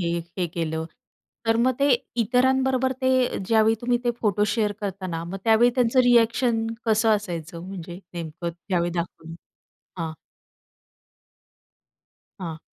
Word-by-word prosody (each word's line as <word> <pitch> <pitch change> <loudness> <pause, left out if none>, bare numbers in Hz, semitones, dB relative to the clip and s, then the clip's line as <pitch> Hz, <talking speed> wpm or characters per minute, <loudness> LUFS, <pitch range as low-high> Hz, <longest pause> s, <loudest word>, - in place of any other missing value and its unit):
हे, 170 -1 0 0.2
हे 180 - +1
केलं, 160 -1 -3 0.6
तर 225 0 +3
मग 255 +2 +2
ते 285 - +4 0.3
इतरांबरोबर 260 +2 +2
ते 260 - +3 0.4
ज्यावेळी 220 0 +4
तुम्ही 240 0 +1
ते 240 - +3
फोटो 210 -1 +2
शेअर 215 -3 +1
करता 195 -2 -4
ना 165 -2 -3
मग 190 +3 -6
त्यावेळी 230 +2 +5
त्यांचं 250 0 +3
रिएक्शन 235 -1 +3 0.2
कसं 220 0 +3
असायचं? 170 -5 -6
म्हणजे 180 -2 -7 0.2
नेमकं 170 +1 -4
त्यावेळी 175 0 -2
दाखवलं 165 -1 -5 0.7
हां. 160 -1 -3 2.3
हां. 165 -3 -5
210 Hz, 125 wpm, -24 LUFS, 170-240 Hz, 2.3 s, त्यावेळी